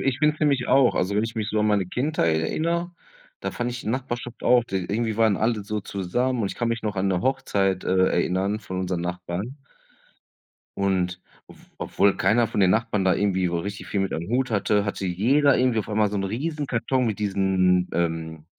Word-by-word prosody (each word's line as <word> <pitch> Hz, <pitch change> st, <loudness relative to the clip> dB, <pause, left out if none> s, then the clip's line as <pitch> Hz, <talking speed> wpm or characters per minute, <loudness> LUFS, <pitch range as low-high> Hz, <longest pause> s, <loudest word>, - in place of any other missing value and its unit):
ich 135 Hz, -1 st, 0 dB
finde 150 Hz, +1 st, +3 dB
es -, -, -20 dB
nämlich 140 Hz, -5 st, +2 dB
auch 135 Hz, -1 st, +4 dB
also, 95 Hz, +2 st, 0 dB
wenn 105 Hz, -, +2 dB
ich 115 Hz, -, -5 dB
mich 110 Hz, -2 st, -2 dB
so 110 Hz, -, +1 dB
an 105 Hz, -, +2 dB
meine 105 Hz, -3 st, +2 dB
Kindheit 125 Hz, -, 0 dB
erinnere, 170 Hz, -, -1 dB, 0.5 s
da -, -, -3 dB
fand 120 Hz, 0 st, -3 dB
ich 120 Hz, 0 st, -5 dB
die -, -, -6 dB
Nachbarschaft 120 Hz, -1 st, -4 dB
auch, 125 Hz, -1 st, +4 dB
d 95 Hz, -4 st, -2 dB
irgendwie 110 Hz, +1 st, -1 dB
waren 110 Hz, -3 st, +4 dB
alle 110 Hz, 0 st, 0 dB
so 105 Hz, +1 st, -3 dB
zusammen 115 Hz, +7 st, -2 dB
und 100 Hz, -3 st, -1 dB
ich -, -, -6 dB
kann 120 Hz, -, -1 dB
mich 115 Hz, 0 st, -2 dB
noch 105 Hz, -2 st, -3 dB
an 95 Hz, +1 st, +1 dB
'ne 90 Hz, -2 st, 0 dB
Hochzeit, 95 Hz, -7 st, 0 dB
äh, 95 Hz, 0 st, +3 dB
erinnern 95 Hz, +4 st, 0 dB
von 95 Hz, -2 st, -5 dB
unseren 90 Hz, -2 st, -2 dB
Nachbarn. 90 Hz, +8 st, -5 dB, 1.2 s
Und 90 Hz, -2 st, 0 dB, 0.3 s
ob -, -, -15 dB, 0.2 s
obwohl 100 Hz, 0 st, +2 dB
keiner 115 Hz, 0 st, +2 dB
von -, -, -4 dB
den 95 Hz, -2 st, +5 dB
Nachbarn 110 Hz, -1 st, +1 dB
da 95 Hz, -, +4 dB
irgendwie 95 Hz, -2 st, +1 dB
so 85 Hz, -1 st, -1 dB
richtig 100 Hz, +2 st, -6 dB
viel 100 Hz, -, -1 dB
mit 95 Hz, -, -1 dB
am 85 Hz, -, -3 dB
Hut 125 Hz, +2 st, 0 dB
hatte, 105 Hz, -1 st, +1 dB
hatte 100 Hz, -1 st, -3 dB
jeder 135 Hz, +11 st, +3 dB
irgendwie 125 Hz, -3 st, +2 dB
auf 110 Hz, -, -3 dB
einmal 105 Hz, -1 st, +1 dB
so 105 Hz, -, -3 dB
'n 100 Hz, -, -1 dB
Riesenkarton 130 Hz, +1 st, -1 dB
mit 110 Hz, -, -2 dB
diesen, 95 Hz, -3 st, +2 dB
ähm 80 Hz, -2 st, -2 dB
105 Hz, 215 wpm, -24 LUFS, 95-120 Hz, 1.2 s, den